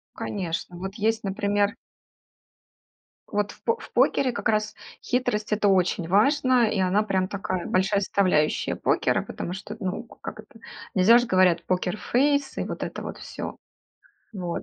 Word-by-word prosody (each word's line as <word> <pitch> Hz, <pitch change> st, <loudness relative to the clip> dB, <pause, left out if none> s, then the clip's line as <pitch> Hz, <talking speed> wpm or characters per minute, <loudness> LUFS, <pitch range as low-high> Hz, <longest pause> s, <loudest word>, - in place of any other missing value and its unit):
Конечно, 175 Hz, -2 st, -4 dB
вот 190 Hz, +2 st, -6 dB
есть, 220 Hz, 0 st, 0 dB
например 205 Hz, +1 st, 0 dB, 1.5 s
Вот, 205 Hz, -1 st, -1 dB
в -, -, -19 dB
по 460 Hz, 0 st, +1 dB, 0.2 s
покере 260 Hz, -2 st, +3 dB
как -, -, -2 dB
раз 215 Hz, 0 st, 0 dB, 0.3 s
хитрость 220 Hz, -4 st, -1 dB
это 210 Hz, -1 st, +2 dB
очень 185 Hz, -3 st, +2 dB
важно, 250 Hz, -, +3 dB
и 210 Hz, -, -1 dB
она 185 Hz, +3 st, +3 dB
прям 190 Hz, -3 st, 0 dB
такая 190 Hz, -2 st, -3 dB
большая 195 Hz, +2 st, +2 dB
составляющая 185 Hz, -6 st, +1 dB
покера, -, -, +1 dB
потому 175 Hz, -, -5 dB
что, 200 Hz, +3 st, -7 dB
т 225 Hz, -, -10 dB
ну, 185 Hz, +5 st, -2 dB
как 230 Hz, -, -10 dB
это, -, -, -19 dB, 0.3 s
нельзя 205 Hz, +5 st, +6 dB
же, 245 Hz, -, +2 dB
говорят, 185 Hz, -5 st, +3 dB
покерфейс 255 Hz, +10 st, 0 dB
и -, -, 0 dB
вот -, -, -5 dB
это -, -, -5 dB
вот -, -, -6 dB
всё, -, -, -7 dB, 0.8 s
вот. 180 Hz, -4 st, -4 dB
200 Hz, 150 wpm, -25 LUFS, 185-220 Hz, 1.5 s, нельзя